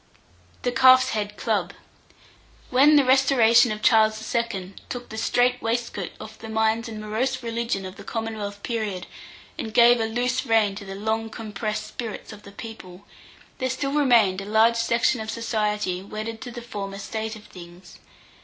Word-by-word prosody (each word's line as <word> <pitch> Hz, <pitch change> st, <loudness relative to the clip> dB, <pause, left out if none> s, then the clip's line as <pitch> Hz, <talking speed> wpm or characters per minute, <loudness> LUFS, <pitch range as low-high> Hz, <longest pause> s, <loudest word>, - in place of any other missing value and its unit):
THE 245 Hz, -, +1 dB
CALF'S 255 Hz, +1 st, +6 dB
HEAD 210 Hz, -3 st, -3 dB
CLUB. 200 Hz, -6 st, -1 dB, 1.0 s
When 280 Hz, +4 st, +6 dB
the 285 Hz, -2 st, +5 dB
restoration 250 Hz, -3 st, +5 dB
of 215 Hz, 0 st, -5 dB
Charles 220 Hz, -1 st, +4 dB
II. 200 Hz, -5 st, -2 dB, 0.2 s
took 245 Hz, -1 st, -6 dB
the 220 Hz, -, -7 dB
strait 245 Hz, +2 st, +2 dB
waistcoat 225 Hz, -5 st, -2 dB
off 215 Hz, 0 st, -10 dB
the 225 Hz, -, -9 dB
minds 220 Hz, +1 st, +1 dB
and 220 Hz, -1 st, -7 dB
morose 240 Hz, +5 st, -2 dB
religion 230 Hz, -4 st, -2 dB
of 185 Hz, 0 st, -8 dB
the -, -, -10 dB
Commonwealth 215 Hz, -3 st, -5 dB
period, 210 Hz, -6 st, -3 dB, 0.5 s
and 220 Hz, -, -4 dB
gave 235 Hz, +1 st, +6 dB
a 225 Hz, -, +1 dB
loose 245 Hz, +3 st, -1 dB
rein 220 Hz, -3 st, +2 dB
to 200 Hz, +1 st, -8 dB
the 195 Hz, 0 st, -7 dB
long 220 Hz, +2 st, -2 dB
compressed 215 Hz, -1 st, -4 dB
spirits 225 Hz, -2 st, -7 dB
of 210 Hz, -, -12 dB
the 200 Hz, -, -13 dB
people, 200 Hz, -4 st, -10 dB, 0.5 s
there 260 Hz, -1 st, -1 dB
still 275 Hz, +2 st, -2 dB
remained 235 Hz, -10 st, +4 dB
a -, -, -7 dB
large 220 Hz, +3 st, +4 dB
section 235 Hz, +1 st, +1 dB
of 220 Hz, -, -6 dB
society 210 Hz, -5 st, -1 dB
wedded 215 Hz, +3 st, -6 dB
to 245 Hz, -, -6 dB
the 240 Hz, 0 st, -8 dB
former 200 Hz, -4 st, -6 dB
state 220 Hz, +2 st, -4 dB
of 215 Hz, -, -12 dB
things. 175 Hz, 0 st, -13 dB
220 Hz, 170 wpm, -24 LUFS, 210-240 Hz, 1.0 s, CALF'S